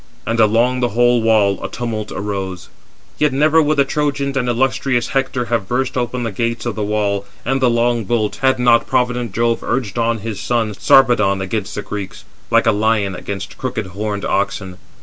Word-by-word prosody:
And 115 +1 -1
along 115 +4 +3
the 120 -3 -1
whole 120 -1 +4
wall 110 -3 +2
a - - -3
tumult 110 -3 -4
arose. 95 -2 -4 0.5
Yet 150 -1 +3
never 155 +4 +4
would 155 0 +1
the 140 - +4
Trojans 140 -1 -1
and 125 -2 0
illustrious 125 0 0
Hector 135 -2 -1
have 115 -4 -1
burst 130 +2 -1
open 125 0 -2
the 115 - -2
gates 115 +4 -2
of 120 - -1
the 110 - -5
wall, 100 -1 0 0.2
and 135 +2 0
the 125 - +4
long 120 -1 +1
bolt, 105 -2 -1
had 130 -1 +2
not 120 -1 +3
provident 125 -3 0
Jove 115 +3 0
urged 120 -4 -2
on 115 0 +1
his 110 -2 -5
son, 110 0 -1
Sarpedon, 120 -4 +4
against 95 -1 -3
the - - -4
Greeks, 100 -2 -7 0.2
like - - +3
a 115 - +5
lion 105 -2 +1
against 100 +1 -6
crooked 125 -5 -3
horned 105 0 -3
oxen. 95 -1 -2
115 Hz, 190 wpm, -18 LUFS, 105-125 Hz, 0.5 s, a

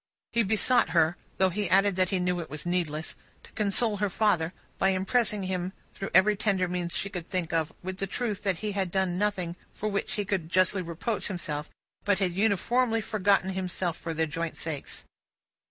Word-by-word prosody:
He 235 - +4
besought 220 +4 +4
her 160 +1 +4 0.2
though 190 -1 +3
he 205 0 -1
added 195 +1 +4
that 185 -1 +2
he 190 - +1
knew 180 0 0
it 165 - -6
was 150 +2 -5
needless 165 -3 -1 0.3
to - - -16
console 210 +1 +2
her 205 0 0
father, 180 -5 +2 0.3
by 195 - +4
impressing 200 +2 +1
him 185 0 -2 0.2
through 195 - -5
every 205 +4 +5
tender 195 -3 +1
means 175 -1 -2
she - - -1
could 180 -4 -6
think 175 -3 -2
of, 160 -1 +1
with 185 +1 -4
the 195 - -2
truth 215 0 -2
that 195 -4 0
he 210 - 0
had 195 -2 -1
done 185 -1 0
nothing 185 -5 0 0.2
for 215 - -3
which 200 -1 -1
he 205 -1 -1
could 185 -5 -2
justly 185 +1 +3
reproach 180 +6 -3
himself, 155 -6 -4 0.3
but 205 -2 +3
had 190 -3 0
uniformly 225 +4 +2
forgotten 200 -3 +2
himself 185 -2 -2
for 165 -1 -5
their 160 +1 +2
joint 165 +2 -4
sakes. 155 -4 -5
185 Hz, 195 wpm, -28 LUFS, 175-205 Hz, 0.3 s, every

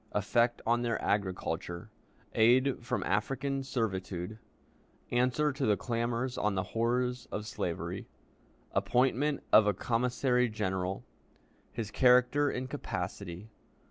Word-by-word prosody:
Effect 115 +4 +1
on 120 +1 +2
their 120 -1 0
Agriculture. 95 -3 -2 0.4
Aid 125 +3 +4
from - - -1
African 135 +7 -1
Servitude. 105 -5 -3 0.7
Answer 125 +5 +2
to 135 - -1
the 105 -2 +3
Clamors 120 +1 -2
on 105 -1 +1
the 95 - 0
Horrors 125 +2 -1
of 105 - -3
Slavery. 90 -5 -4 0.6
Appointment 135 +3 +1
of 105 -1 +8
a 105 - +2
Commissary 125 +3 +1
General. 95 -3 -2 0.7
His 110 -2 -5
Character 125 +4 +4
and 130 -1 -3
Capacity. 95 -4 -5
120 Hz, 110 wpm, -31 LUFS, 105-125 Hz, 0.7 s, of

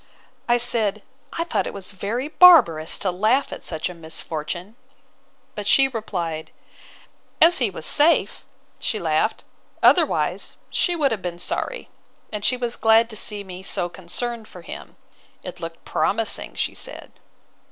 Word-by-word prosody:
—I 240 - +5
said, 220 -4 +1 0.3
I 335 - -1
thought 340 - -1
it - - -7
was 195 -1 -7
very 210 +8 -3
barbarous 300 - +6
to 190 - -1
laugh 220 +9 +1
at - - -9
such 160 -2 -2
a 180 - -7
misfortune; 165 +3 -6 0.8
but 210 -1 -5
she 270 +4 +5
replied, 175 -10 -4 0.9
As 335 0 +7
he 240 -5 +2
was 175 - -5
safe, 305 +3 +3 0.4
she - - -1
laughed; - - 0 0.4
otherwise - - +2
she 355 - +1
would 290 -5 +1
have 215 -4 -2
been 175 -1 -5
sorry: - - -4 0.4
and 210 -1 -5
she 250 - +2
was 240 -1 -3
glad 225 +1 +4
to - - -8
see 210 -1 -1
me 185 -1 -9
so 175 -2 -2
concerned 215 +6 -4
for 180 - -13
him—It - - -12
looked 165 0 -8
promising, 225 +2 0
she - - -2
said. - - -6
210 Hz, 150 wpm, -22 LUFS, 175-245 Hz, 0.9 s, As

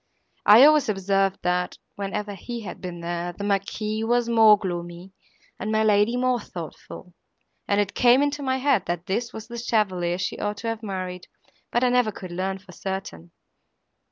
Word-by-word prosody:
I 215 +5 +9
always 300 -4 +5
observed, 195 -1 +1
that, 180 0 0 0.2
whenever 205 +1 -4
he 235 +5 -7
had 205 - -8
been 175 -2 -6
there, 175 +1 -3
the 200 - -7
Marquis 210 +2 -1
was 240 +1 +1
more 220 -2 +6
gloomy 175 -1 -6 0.5
and 215 +3 -3
my 220 0 +2
lady 210 +3 +3
more 250 -1 +1
thoughtful, 175 -1 -9 0.5
and 200 0 +2
it 200 -1 0
came 250 +2 +5
into 290 0 -1
my 260 -1 0
head, 265 -5 +1
that 175 0 -3
this 230 +5 -2
was 220 0 -9
the 235 0 -6
chevalier 185 -7 0
she 185 - -3
ought 205 0 -2
to 230 - -6
have 225 0 -4
married, 185 -3 -5 0.4
but 240 - +1
I 250 - +4
never 245 -3 +2
could 185 -3 -9
learn 190 +2 -2
for 190 -1 -16
certain." 180 - -6
205 Hz, 180 wpm, -24 LUFS, 185-230 Hz, 0.5 s, I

